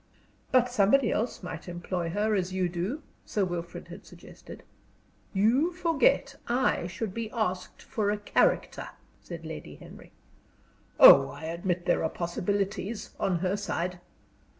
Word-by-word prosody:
"But 255 -2 +4
somebody 245 +1 +3
else 225 -2 -2
might 165 -2 -7
employ 175 0 -3
her 210 +5 0
as 185 -2 0
you 185 -1 0
do?" 185 - -3 0.2
Sir 205 -3 -1
Wilfrid 175 -1 -6
had - - -10
suggested. - - -13 0.7
"You 235 - +3
forget 345 - +2
I 240 -7 +1
should 190 +2 -5
be 230 0 -4
asked 185 -6 -3
for 210 -2 -1
a 210 - 0
character," 205 - +1 0.3
said - - -9
Lady - - -8
Henry. - - -14 0.9
"Oh, - - +10
I - - -10
admit 175 +2 -2
there - - +2
are 160 - +1
possibilities 195 +5 -3
on 185 -3 +1
her 185 +2 +1
side. 180 -3 -3
195 Hz, 140 wpm, -28 LUFS, 175-230 Hz, 0.9 s, Oh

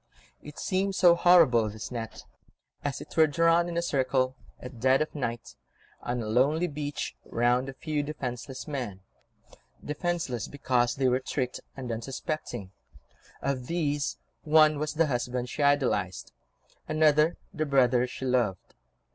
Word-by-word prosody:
It 150 0 -11
seemed 195 +1 -1
so 175 -1 +6
horrible, 170 -11 +5
this 110 +3 -7
net, 115 -2 -6 0.6
as 140 -1 -3
it - - -11
were 160 -1 +6
drawn 165 +3 +3
in 170 - -4
a 170 - +1
circle, 130 -4 +1 0.2
at 125 -2 -10
dead 130 +2 +4
of 155 - -2
night, 120 -5 -4 0.5
on 120 -1 -2
a - - -5
lonely 140 +9 +2
beach, 145 -3 -4
round 120 +3 +1
a - - -7
few 150 +2 -2
defenceless 135 -2 -5
men, 120 -10 -4 0.8
defenceless 150 - -2
because 125 -4 0
they 135 -1 +1
were 125 0 +2
tricked 130 -1 -3 0.2
and 125 -3 -5
unsuspecting; 120 - -5 0.7
of 130 -3 -2
these 145 -4 -1 0.3
one 155 -1 +5
was 150 0 -3
the 165 +1 +3
husband 125 -2 -2
she 150 - -4
idolised, 140 -10 +1 0.6
another 155 +1 +3 0.2
the 155 0 -2
brother 125 -3 +3
she 130 - -7
loved. 120 -8 0
135 Hz, 145 wpm, -28 LUFS, 125-155 Hz, 0.8 s, so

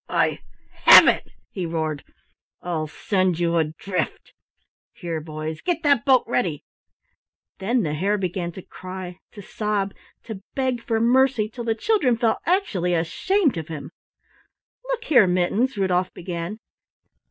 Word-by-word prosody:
"I - - +1 0.5
have - - +10
it," - - +2 0.2
he 180 -4 -4
roared, 160 -3 -3 0.6
"I'll 160 -3 -3
send 185 +2 0
you 170 0 +1
adrift! 165 +4 -3 0.6
Here, 170 -4 -5
boys, 155 0 -6
get 345 -2 -2
that 285 -5 +3
boat 260 -3 +5
ready!" 175 -11 -1 0.9
Then 230 +4 +1
the 150 -3 -2
Hare 195 +7 0
began 180 -2 -3
to 190 - -9
cry, 185 -1 -8
to 205 - -10
sob, 205 -1 -2 0.3
to 215 -4 -8
beg 260 -3 -1
for 225 -1 -1
mercy, 245 -1 +3
till 235 +1 -7
the 225 -1 0
children 265 - +1
felt 230 -1 +1
actually 200 - +1
ashamed 290 - +1
of 160 -2 -5
him. 155 -2 -7 0.9
"Look - - -3
here, 245 -10 +5
Mittens," 195 +8 +1
Rudolf 185 -2 +1
began. 175 +3 -5
190 Hz, 140 wpm, -23 LUFS, 170-240 Hz, 0.9 s, have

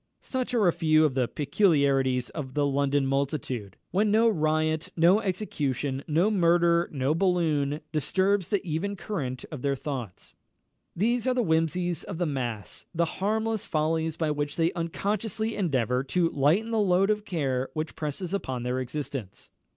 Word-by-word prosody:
Such 255 -1 -2
are 215 -5 +4
a 170 - +4
few 155 -1 +4
of 145 - +1
the 125 -2 +1
peculiarities 140 - +2
of 135 -4 -6
the 145 -1 +2
London 140 0 +1
multitude, 135 - -2
when 210 +3 +2
no 220 +3 +4
riot, 155 -3 0
no 175 +5 +5
execution, 145 - -2
no 170 +8 +2
murder, 170 -2 +3
no 135 0 0
balloon, 160 -5 +1
disturbs 190 +5 +1
the 205 -1 0
even 180 +5 -2
current 145 -11 -4
of 150 -5 -6
their 140 0 0
thoughts. 130 -8 -6 0.6
These 235 +6 +1
are 255 - +2
the 245 - +2
whimsies 165 0 0
of 185 - -6
the 175 - 0
mass 120 -8 -4
the 170 +1 +2
harmless 220 +5 -1
follies 160 +1 0
by 160 -2 0
which 145 0 -2
they 165 +1 +1
unconsciously 210 +5 -2
endeavour 130 - 0
to 170 +4 +1
lighten 165 +12 +2
the 225 - +1
load 195 0 +3
of 210 0 -1
care 135 -8 -1
which 155 +1 -3
presses 160 +5 -4
upon 130 -11 -3
their 125 +1 -1
existence. 130 -5 -6
160 Hz, 160 wpm, -27 LUFS, 140-190 Hz, 0.6 s, no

